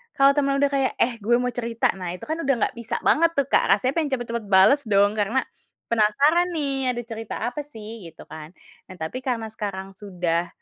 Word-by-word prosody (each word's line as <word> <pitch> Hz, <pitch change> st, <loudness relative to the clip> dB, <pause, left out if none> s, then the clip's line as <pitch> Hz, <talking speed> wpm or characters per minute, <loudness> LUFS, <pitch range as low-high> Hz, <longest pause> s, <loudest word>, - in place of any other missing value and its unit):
kalau 275 Hz, 0 st, +6 dB
temen 280 Hz, -1 st, +1 dB
udah 280 Hz, 0 st, +2 dB
kayak, 270 Hz, -2 st, 0 dB
"Eh, 235 Hz, -1 st, 0 dB
gue 225 Hz, +3 st, +2 dB
mau 250 Hz, +1 st, 0 dB
cerita!" 230 Hz, -1 st, 0 dB
Nah 180 Hz, -1 st, -4 dB
itu -, -, -13 dB
kan 315 Hz, +2 st, -3 dB
udah 275 Hz, -4 st, +1 dB, 0.2 s
gak -, -, -28 dB
bisa 230 Hz, -1 st, -4 dB
banget 335 Hz, +2 st, +3 dB
tuh, 280 Hz, -1 st, 0 dB
Kak, -, -, +4 dB
rasanya 255 Hz, -, -1 dB
pengen 310 Hz, -3 st, -1 dB
cepet-cepet 235 Hz, -2 st, -5 dB
bales 195 Hz, +9 st, +6 dB
dong 200 Hz, -1 st, +4 dB
karena, 220 Hz, +6 st, +1 dB, 0.5 s
penasaran 275 Hz, +11 st, +3 dB
nih 270 Hz, -4 st, -1 dB
ada 240 Hz, -, -3 dB
cerita 225 Hz, -1 st, -7 dB, 0.2 s
apa 270 Hz, -, -6 dB
sih, 220 Hz, -6 st, -9 dB
gitu 165 Hz, -, -13 dB
kan. 155 Hz, +2 st, -10 dB, 0.3 s
Nah 185 Hz, -, -11 dB
tapi 160 Hz, +11 st, -4 dB
karena 235 Hz, -4 st, -2 dB
sekarang 195 Hz, -3 st, -5 dB
sudah, 175 Hz, -4 st, -2 dB
235 Hz, 205 wpm, -24 LUFS, 200-275 Hz, 0.5 s, kalau